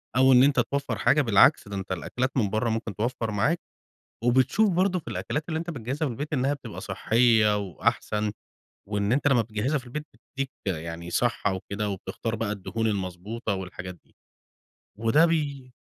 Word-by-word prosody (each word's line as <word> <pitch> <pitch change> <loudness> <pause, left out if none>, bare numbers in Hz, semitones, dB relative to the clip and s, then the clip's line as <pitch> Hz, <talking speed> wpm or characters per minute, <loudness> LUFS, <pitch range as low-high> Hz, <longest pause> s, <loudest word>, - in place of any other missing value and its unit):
أو 130 +1 +6
إن 125 - +7
أنت 140 -1 +4
توفر 140 -5 -1
حاجة، 150 +8 +4
بالعكس 110 -5 +5
ده 100 - -6
أنت 95 -1 -5
الأكلات 125 +8 -2
من 105 -5 +2
بره 110 +3 0
ممكن 110 -2 -3
توفر 115 +1 -2
معاك، 130 +12 +1 0.7
وبتشوف 130 - +3
برضو 185 +1 +2
في - - -11
الأكلات 150 +1 -3
اللي 160 -1 -1
أنت 170 +1 -4
بتجهزها 140 +2 -3
في 125 - -4
البيت 145 +7 -5
إنها 135 0 +1
بتبقى 140 - -9
صحية 110 -3 +3
وأحسن، 105 +2 -1 0.6
وإن 105 +1 0
أنت 145 +3 +1
لما 125 -4 +4
بتجهزها 115 +7 -1
في 130 - -12
البيت 150 +5 -5
بتديك 135 -1 -6 0.2
يعني 85 0 -4
صحة 115 -1 +1
وكده 100 +3 -3
وبتختار 105 +3 -4
بقى 110 -1 -2
الدهون 110 +3 -3
المضبوطة 100 +2 -2
والحاجات 90 -1 -6
دي. - - -31 0.8
وده 115 +9 +4
بي 140 -6 -2
115 Hz, 170 wpm, -26 LUFS, 105-140 Hz, 0.8 s, إن